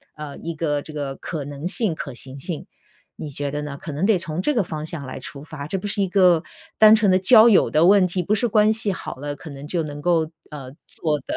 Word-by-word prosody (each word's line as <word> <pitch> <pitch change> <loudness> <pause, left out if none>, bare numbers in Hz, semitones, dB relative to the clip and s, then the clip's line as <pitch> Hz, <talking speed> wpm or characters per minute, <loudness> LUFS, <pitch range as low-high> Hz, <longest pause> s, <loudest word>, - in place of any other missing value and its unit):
呃， 150 -2 -8
一 170 - -6
个 150 -2 -2
这 155 - -11
个 140 -2 -4
可 150 -2 -6
能 145 +3 -6
性、 200 -1 +2
可 140 -4 -7
行 130 +3 -5
性， 160 +3 -4 0.5
你 155 - -7
觉 145 0 -4
得 145 +1 -3
呢？ 145 -1 -6
可 160 - -7
能 150 +6 -1
得 215 -2 +3
从 170 -1 -4
这 295 - +1
个 230 -6 +1
方 155 -3 -6
向 155 -3 -6
来 130 - -7
出 145 0 -8
发， 150 -2 -8
这 190 - -2
不 205 - -5
是 200 0 0
一 195 - +1
个 180 -4 +4 0.3
单 215 0 +8
纯 215 -2 +2
的 185 - +4
交 220 +4 +7
友 205 - +4
的 155 +2 +3
问 195 0 +5
题， 180 +1 -2
不 200 - 0
是 230 +3 +1
关 215 -1 +3
系 220 -2 +1
好 185 - -6
了 145 +2 -6
可 160 - -11
能 140 0 -9
就 165 +1 -1
能 145 -1 -7
够， 165 -1 +1 0.2
呃， 140 -4 -9 0.2
做 150 -3 -2
的， 135 - -6
160 Hz, 280 characters per minute, -22 LUFS, 145-190 Hz, 0.5 s, 单